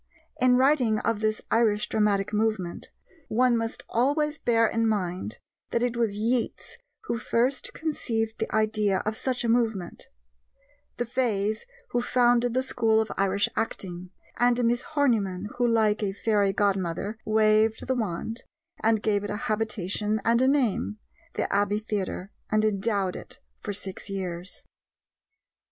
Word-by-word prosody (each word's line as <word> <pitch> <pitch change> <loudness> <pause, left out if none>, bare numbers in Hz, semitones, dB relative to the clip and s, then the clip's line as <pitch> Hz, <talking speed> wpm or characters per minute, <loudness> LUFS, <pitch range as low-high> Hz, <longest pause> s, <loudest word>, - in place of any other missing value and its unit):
In 250 0 +5
writing 255 -5 +3
of 225 0 0
this 215 0 0
Irish 210 -2 +3
dramatic 210 -1 +1
movement, 210 -5 -1 0.4
one 245 +2 +3
must 225 0 -3
always 295 +6 +1
bear 230 -1 +3
in 225 0 +1
mind 180 - -2 0.3
that 235 - 0
it 245 -1 0
was 225 -4 0
Yeats 240 - -1 0.2
who 235 - -2
first 250 +4 0
conceived 225 -8 -2
the - - -2
idea 215 -3 +1
of 215 +1 -1
such 250 +1 -1
a - - 0
movement; 225 -6 0 0.9
the 240 - -1
Fays 220 - -1 0.2
who 240 - +1
founded 245 -1 +3
the 260 - +2
school 225 -4 +2
of 220 -1 -1
Irish 195 +1 +2
acting; 180 -4 -3 0.3
and 245 0 +3
Miss 240 +1 +2
Horniman 215 -11 0
who, 245 - +3
like 220 -2 +2
a 200 -2 -1
fairy 205 -1 +2
godmother, 195 +1 -1
waved 215 0 +3
the 260 - +1
wand, 225 0 -3 0.4
and 220 -1 +3
gave 205 -2 +1
it 205 - -4
a 210 - -2
habitation 215 0 -1
and 235 +1 +4
a 260 - +4
name 250 -6 +1 0.4
the - - 0
Abbey 205 +1 +2
Theatre 205 -2 -3 0.2
and 215 0 +2
endowed 200 -2 0
it - - -9 0.2
for 205 - -5
six 195 0 -6
years. 185 -2 -5
220 Hz, 145 wpm, -26 LUFS, 205-240 Hz, 0.9 s, In